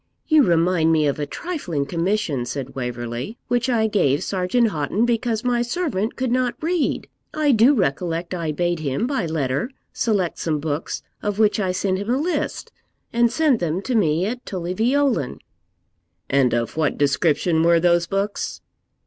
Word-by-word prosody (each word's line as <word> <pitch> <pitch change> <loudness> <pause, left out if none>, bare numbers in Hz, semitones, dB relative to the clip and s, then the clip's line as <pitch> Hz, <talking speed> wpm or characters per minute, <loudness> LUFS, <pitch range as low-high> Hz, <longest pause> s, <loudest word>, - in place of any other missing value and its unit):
'You 310 -2 +5
remind 170 - +3
me 155 -2 +3
of 145 0 0
a 145 - -2
trifling 180 - -3
commission,' 170 - -1
said 135 +1 -5
Waverley, 125 - -4
'which 245 +1 +1
I 230 -3 +2
gave 155 -10 +2
Sergeant 200 +5 +1
Houghton, 165 +6 0
because 230 -1 0
my 245 -1 +1
servant 240 - -1
could 260 -2 -1
not 250 0 +1
read. 335 0 -1 0.3
I 305 -2 +3
do 245 +4 +5
recollect 170 - -1
I 165 -3 -2
bade 175 +2 -1
him, 145 - -1
by 265 -9 -1
letter, 145 - -1 0.2
select 200 -7 0
some 155 -2 0
books, 150 +1 -3 0.2
of 205 -1 -2
which 215 -1 +3
I 190 -3 0
sent 185 0 -1
him 205 +3 -5
a 250 - +2
list, 335 +5 -2 0.4
and 235 0 +3
send 290 -3 +2
them 170 0 -1
to 255 - -2
me 175 -5 +2
at 245 +4 -4
Tully 180 -2 -4
Veolan.' 240 - +1 0.9
'And 135 -3 +3
of 115 0 -2
what 155 -1 0
description 160 +3 +2
were 170 0 +4
those 175 0 +3
books?' 200 +2 -2
185 Hz, 165 wpm, -22 LUFS, 155-235 Hz, 0.9 s, You